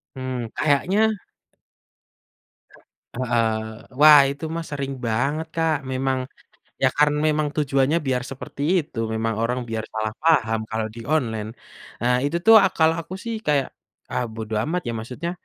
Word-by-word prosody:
Mmm, 130 -2 -4
kayaknya 195 +9 +2 2.0
Heeh, 120 -2 +1 0.5
wah 150 0 +9
itu 140 +3 -7
mah 165 - -4
sering 140 -1 -3
banget 140 +8 -1
Kak 165 -1 +2 0.2
memang, 130 0 0 0.6
iya - - +5
karena 150 0 +3
memang 155 -1 +1
tujuannya 140 +1 +2
biar 125 -1 0
seperti 135 +1 -7 0.2
itu 145 -5 -10 0.2
memang 110 0 -1
orang 125 +2 0
biar 110 -1 -3
salah 110 0 -2
paham 110 -9 +3
kalau 110 0 -2
di 115 - -8
online, 115 -8 -1 0.5
ah, 125 +2 +2
itu 145 +4 0
tuh 225 +5 +7 0.2
kala 160 0 +4
aku 185 - -8
sih 230 -1 -3
kayak, 140 -3 +2 0.4
ah, - - -1
bodo 110 -1 -5
amat 180 +6 -1
ya - - -1
maksudnya, 125 +10 -5
135 Hz, 145 wpm, -23 LUFS, 115-155 Hz, 2.0 s, wah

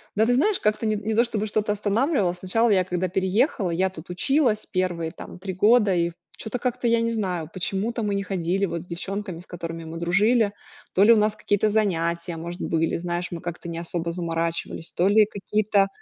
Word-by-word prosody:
Да, 215 +2 +4
ты 245 - +3
знаешь, 375 +11 +2
как-то 215 +1 0
не 215 0 +1
не 215 +2 -2
то 235 - +5
чтобы 215 -3 -2
что-то 210 0 0
останавливало. 210 - +1
Сначала 190 +6 +1
я, 190 -3 +4
когда 180 0 -1
переехала, 190 - +1
я 185 +3 +1
тут 170 -2 -11
училась 220 - +1
1 175 -5 -1
там 175 - -10
3 190 0 -4
года, 210 +1 +4
и 170 0 +1 0.3
чё-то 220 +2 -4
как-то, 250 0 -1
я 230 0 +3
не 230 0 0
знаю, 180 -7 -2
почему-то 200 +6 -2
мы 205 -2 0
не 200 - -1
ходили 190 0 0
вот 170 -3 -4
с 175 - -13
девчонками, 185 +1 -5
с 175 - -10
которыми 165 -2 -6
мы 160 +1 -7
дружили. 205 +5 +2 0.4
То 190 - +5
ли 225 - +7
у - - +4
нас 210 0 +2
какие-то 205 0 +1
занятия, 170 -5 0
может, 170 +2 -6
были, 165 0 0
знаешь, 175 +1 -2
мы 170 -1 -5
как-то 175 -1 -6
не 165 - -5
особо 170 0 -3
заморачивались, 165 -1 -3
то 180 - +2
ли 215 +1 +6
какие-то 205 0 +1
195 Hz, 205 wpm, -24 LUFS, 175-215 Hz, 0.4 s, ли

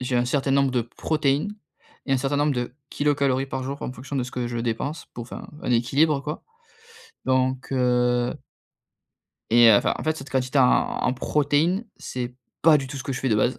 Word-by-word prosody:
J'ai 125 0 -1
un 120 - +2
certain 135 +2 0
nombre 140 -1 +3
de 125 - +2
protéines 150 - -1 0.5
et 135 - 0
un - - +4
certain 135 +2 -1
nombre 145 0 +2
de 125 0 -3 0.2
kilocalories 140 -2 +1
par 135 -1 -4
jour 140 +2 -5
en 125 - -4
fonction 130 +3 -7
de 125 - 0
ce 125 - -8
que 120 -1 -2
je 120 - -3
dépense 120 +7 -3
pour 120 - -5
enfin, 120 - -8 0.2
un - - -2
équilibre, 140 +6 +3
quoi. 150 +2 -5 0.8
Donc, 130 0 0
heu 125 -1 +2 1.2
et, 120 0 +7
heu, 105 - +8
enfin - - +1
en - - -5
fait 155 0 0
cette 135 -2 -9
quantité 130 +1 0
en - - +7 0.4
en - - +2
protéines 150 - +1
c'est 125 -1 -5 0.3
pas 155 -1 +7
du 135 - -4
tout 140 +1 -7
ce 130 - -5
que 140 - -3
je - - -3
fais 135 - 0
de 110 - +3
base. 120 +5 +1
130 Hz, 210 wpm, -24 LUFS, 125-145 Hz, 1.2 s, heu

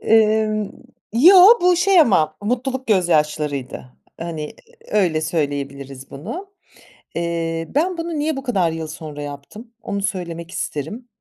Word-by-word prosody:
Emm, 215 -1 +2 0.4
yo, 320 - +7 0.3
bu 360 0 +4
şey 370 0 +5
ama 155 - +3
mutluluk 255 +4 -2
gözyaşlarıydı. 150 - 0 0.4
Hani 160 -3 -5 0.4
öyle 180 -7 +2
söyleyebiliriz 140 -4 -4
bunu. 355 - -7 0.6
Eee, 165 -1 -2
ben 345 +5 +1
bunu 330 -2 -3
niye 300 -1 -1
bu 270 - -5
kadar 190 -10 +1
yıl 160 -1 -5
sonra 155 -2 -8
yaptım, 145 - -9
onu 200 0 -3
söylemek 175 -4 -4
isterim. 210 - -5
175 Hz, 125 wpm, -20 LUFS, 155-240 Hz, 0.6 s, yo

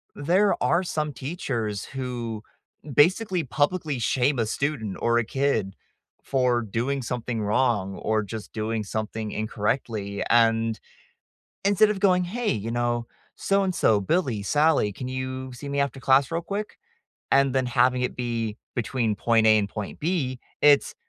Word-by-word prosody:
there 185 +8 +2
are 180 - +2
some 155 -4 -2
teachers 125 - -3
who 120 -5 -5 0.5
basically 180 - +3
publicly 145 +1 0
shame 130 +3 +1
a 115 - +2
student 110 -4 -2
or 120 0 +2
a 120 - +2
kid 115 -7 0 0.5
for 125 -3 +1
doing 120 +6 -2
something 120 -2 -3
wrong 105 -3 +1
or 110 0 0
just 110 +1 -8
doing 110 0 -2
something 110 +1 -4
incorrectly 105 -1 -2
and 115 -1 +3 0.9
instead 205 +2 +4
of 195 - -2
going, 180 -2 +3
"Hey, 225 +6 -1
you 110 +1 -3
know, 120 0 -1 0.3
so-and-so, 190 - +2
Billy, 120 - 0
Sally, 145 -4 +2
can 125 +5 -6
you 130 0 -4
see 130 +4 -8
me 140 - 0
after 140 -1 -1
class 135 0 +4
real 165 +1 -2
quick?" 200 +4 -5 0.5
And 135 -1 +4
then 130 -1 +1
having 125 +1 +2
it 125 - -2
be 115 -3 -2 0.2
between 115 -1 -1
point 115 0 +3
A 110 0 +6
and 100 -1 -1
point 105 -1 -6
B, 145 -6 -1 0.2
it's, 145 -1 +5
125 Hz, 150 wpm, -25 LUFS, 110-145 Hz, 0.9 s, A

